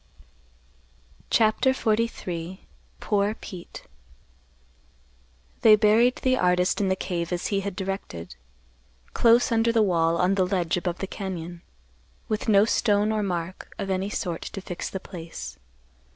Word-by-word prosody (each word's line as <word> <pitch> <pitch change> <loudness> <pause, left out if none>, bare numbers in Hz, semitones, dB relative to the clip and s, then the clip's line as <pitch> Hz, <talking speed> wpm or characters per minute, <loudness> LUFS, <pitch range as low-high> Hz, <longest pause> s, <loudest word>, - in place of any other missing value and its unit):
CHAPTER 220 +4 +3
XLIII. 200 -7 -2 0.3
POOR 205 0 0
PETE. 180 -6 -10 1.8
They 215 -1 +8
buried 220 +4 +4
the 255 0 +2
artist 180 +2 +2
in 195 - +1
the 190 - +2
cave 175 -2 -3
as 175 -1 -2
he 200 - +2
had 195 -1 -4
directed, 185 - -5 0.8
close 235 +1 +4
under 230 0 +3
the 225 -1 +3
wall 170 -3 +2
on 180 +2 +2
the 190 -2 +2
ledge 180 -3 0
above 175 -1 -2
the 195 - -4
cañon, 175 -4 -6 0.7
with 215 +1 -2
no 205 0 +6
stone 210 -2 +2
or 215 -1 0
mark 180 -2 -4
of 195 - -3
any 190 +1 -1
sort 175 -5 -3
to - - -6
fix 180 -2 -5
the 190 - -5
place. 160 - -8
195 Hz, 135 wpm, -25 LUFS, 175-215 Hz, 1.8 s, They